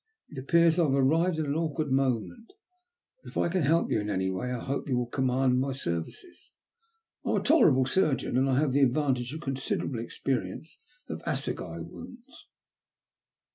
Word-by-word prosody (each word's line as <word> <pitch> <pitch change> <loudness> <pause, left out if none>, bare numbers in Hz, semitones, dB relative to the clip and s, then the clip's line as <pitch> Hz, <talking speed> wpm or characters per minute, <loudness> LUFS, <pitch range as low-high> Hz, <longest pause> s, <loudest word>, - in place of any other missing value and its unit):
It 145 - -8
appears 170 +4 +3
I 170 - +4
have 135 - +1
arrived 160 +6 +2
at 155 - -1
an 140 - -1
awkward 155 -2 -2
moment, 135 - -1 0.7
but - - -10
if - - -8
I - - +2
can 180 +1 0
help 160 +3 +2
you - - +2
in 105 - -4
any 95 -1 0
way 95 +7 -3
I 125 - -2
hope 135 +4 -4
you 125 - +1
will 125 - 0
command 130 0 +1
my 135 +1 -1
services. 130 - -6 0.7
I - - -3
am - - +2
a - - +2
tolerable 155 - +5
surgeon, 135 -4 0
and 135 +2 +2
I 130 0 +2
have 150 -3 +1
the 140 +2 +2
advantage 130 -2 +1
of 155 +2 -6
considerable 135 -3 -3
experience 125 - -4 0.3
of - - -6
assegai - - -3
wounds." 245 +2 -12
135 Hz, 180 wpm, -28 LUFS, 125-160 Hz, 0.7 s, tolerable